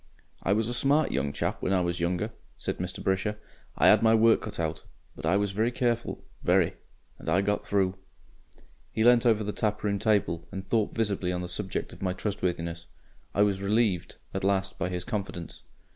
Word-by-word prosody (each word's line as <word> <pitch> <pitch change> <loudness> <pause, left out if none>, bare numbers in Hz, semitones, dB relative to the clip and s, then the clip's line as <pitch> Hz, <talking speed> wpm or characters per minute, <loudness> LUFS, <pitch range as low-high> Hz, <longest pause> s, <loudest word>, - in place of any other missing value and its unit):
"I 95 - +2
was 110 +1 +1
a 120 - -1
smart 140 +5 +3
young 70 +1 0
chap - - -2
when 95 - 0
I 95 - +3
was 85 0 -1
younger," 90 +6 -1 0.3
said - - -2
Mr. 90 +1 -4
Brisher. 95 +3 0 0.4
"I - - +5
'ad - - +7
my 110 0 +5
work 115 0 +5
cut 105 - -6
out. 80 -1 -2 0.3
But - - -4
I 95 +4 +4
was 100 -1 0
very 110 +4 +1
careful 120 -1 -1 0.2
very. - - +3 0.5
And - - -5
I 90 +4 +3
got 105 +1 0
through..." 95 -2 +1 1.0
He 110 - 0
leant 120 0 +6
over 110 -2 +3
the 105 - -2
taproom 105 -1 -1
table 100 -6 +1
and 95 0 -6
thought 110 -1 0
visibly 100 -5 0
on 90 0 -2
the - - -4
subject 95 +2 -3
of - - -14
my 95 -1 0
trustworthiness. 85 -4 -3 0.5
I 100 - +5
was 100 -2 +1
relieved 100 -3 +1 0.2
at 95 - -3
last 95 0 0
by 95 - 0
his 90 -1 -3
confidence. 95 -6 -5
100 Hz, 195 wpm, -28 LUFS, 90-110 Hz, 1.0 s, ad